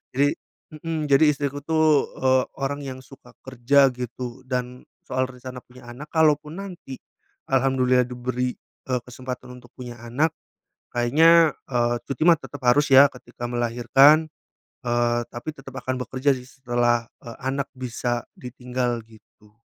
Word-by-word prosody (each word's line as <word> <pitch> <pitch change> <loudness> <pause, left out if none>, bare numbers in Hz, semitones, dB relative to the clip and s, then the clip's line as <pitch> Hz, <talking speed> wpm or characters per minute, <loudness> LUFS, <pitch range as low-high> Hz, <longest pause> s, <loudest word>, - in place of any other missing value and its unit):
Jadi 140 +2 +2 0.4
mhm, 160 0 -3
jadi 145 +2 +5
istriku 145 0 -3
tuh, 155 -1 +2
eee, 130 0 +3 0.2
orang 140 +1 -2
yang 130 -1 -6
suka 130 -2 -16 0.2
kerja 135 +2 +4
gitu, 125 0 -6
dan 125 0 -4 0.2
soal 130 0 0
rencana 125 0 -9
punya 125 +1 -17
anak, 125 +5 -9
kalaupun 155 +1 +2
nanti 175 -8 -9 0.5
alhamdulillah 130 -1 +3
diberi, 125 0 -3 0.3
eee, 125 -1 0
kesempatan 125 0 -8
untuk 120 -1 -19
punya 120 -2 -9
anak, 135 +7 0 0.6
kayaknya, 160 +7 +5 0.2
eee, 120 -1 +1
cuti 135 +3 -3
mah 170 -2 +6
tetap 145 -2 -10
harus 145 +4 +4
ya 135 +1 +9
ketika 120 -1 -9
melahirkan, 120 +6 +4 0.6
eee, 120 -1 +1
tapi 120 +6 -6
tetap 135 -1 -10
akan 130 +1 -2
bekerja 130 +3 +1
sih 130 - -8
setelah, 120 -3 0 0.2
eee, 115 -1 -9
anak 135 +1 -3
bisa 120 -1 -3
ditinggal 125 -1 -3
gitu. 105 -1 -22
130 Hz, 140 wpm, -24 LUFS, 120-140 Hz, 0.6 s, ya